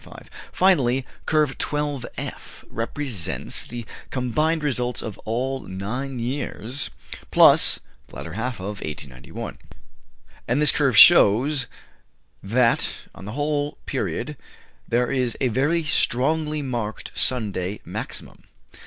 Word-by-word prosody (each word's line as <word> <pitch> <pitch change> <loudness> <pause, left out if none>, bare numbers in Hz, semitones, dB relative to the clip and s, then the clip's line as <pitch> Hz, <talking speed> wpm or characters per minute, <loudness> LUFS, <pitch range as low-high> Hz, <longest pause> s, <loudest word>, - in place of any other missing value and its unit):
Finally, 135 -9 +3 0.2
Curve 150 -3 +2
12 145 -4 -2
F - - -8
represents 115 - -3
the 120 -1 -6 0.2
combined 150 +6 0
results 125 -4 -1
of 105 -4 -6
all 130 +4 -1
nine 125 +8 -4
years 125 +1 -2 0.4
plus - - +6 0.3
(the - - -15
latter 80 - -7
half 120 +2 -3
of) 100 +2 -5
1891; 70 -4 -7 0.9
and 125 +4 +2
this 150 -1 +6
curve 135 -7 +2
shows 125 +6 +7 0.7
that, 115 +4 +2 0.2
on 95 - -11
the 105 - -6
whole 145 +1 -1
period, - - -3 0.5
there 120 +2 +1
is 125 -4 0
a 130 - +2
very 145 +8 +1
strongly 150 +2 +1
marked 115 -5 -4
Sunday 105 -5 -1
maximum. - - -6
125 Hz, 110 wpm, -24 LUFS, 110-145 Hz, 0.9 s, shows